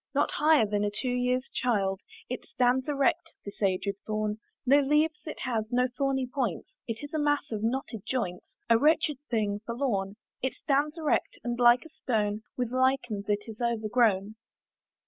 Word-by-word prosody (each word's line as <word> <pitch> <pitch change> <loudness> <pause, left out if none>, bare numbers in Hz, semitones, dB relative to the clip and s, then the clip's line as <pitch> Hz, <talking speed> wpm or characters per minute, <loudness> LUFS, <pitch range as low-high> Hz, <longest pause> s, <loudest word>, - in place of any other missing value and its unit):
Not - - +2
higher 305 -5 +4
than 205 0 0
a 205 - +1
two 245 +5 -2
years' 250 +1 0
child, 200 -6 0 0.3
It - - -4
stands 255 +2 +1
erect 290 +4 +1
this 200 - -9
aged 195 0 0
thorn; 215 0 -1 0.3
No 275 +3 +6
leaves 300 +2 +2
it 310 - -6
has, 225 -3 -2
no 250 +1 +3
thorny 270 -1 0
points; 250 - -3
It 230 +3 -4
is 290 - -8
a 310 - 0
mass 290 -2 +1
of 215 -2 -2
knotted 230 -1 -2
joints, 185 -9 -3 0.2
A 230 -1 +5
wretched 305 -1 +3
thing 210 -3 0
forlorn. 225 -5 -1 0.3
It 260 -1 -1
stands 295 +3 0
erect, 310 -2 0
and 240 0 -2
like 240 +3 +6
a - - -11
stone 215 -8 -1 0.2
With 245 -2 -1
lichens 255 -6 0
it 205 0 +1
is 225 +1 -9
overgrown. 220 -3 +1
245 Hz, 170 wpm, -28 LUFS, 215-270 Hz, 0.3 s, No